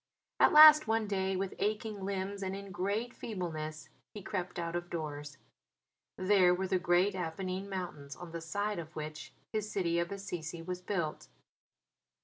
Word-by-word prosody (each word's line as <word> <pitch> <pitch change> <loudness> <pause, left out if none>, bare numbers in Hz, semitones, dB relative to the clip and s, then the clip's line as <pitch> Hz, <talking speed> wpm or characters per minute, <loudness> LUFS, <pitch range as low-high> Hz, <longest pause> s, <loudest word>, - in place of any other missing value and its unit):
At - - +6
last 305 -1 +10
one 225 0 +1
day, 190 -2 -1
with 190 +1 -2
aching 215 -1 -2
limbs 195 +1 -3
and 190 0 -2
in 200 0 -8
great 200 +7 -2
feebleness, 160 -6 -5 0.3
he 205 - -7
crept 185 -3 -4
out 170 0 -3
of 175 0 -3
doors. 145 -3 -5 0.8
There 185 -2 +4
were 190 +1 -2
the 185 0 +1
great 180 +3 +3
Apennine 185 +2 -4
Mountains 170 -7 -5
on 175 -2 -9
the 170 0 -5
side 205 +4 -2
of 160 -1 -9
which 155 0 -6 0.2
his 215 -1 -1
city 170 -3 +1
of 170 +1 -2
Assisi 175 -4 -5
was 180 +1 -5
built. 175 -5 -3
185 Hz, 160 wpm, -32 LUFS, 170-200 Hz, 0.8 s, last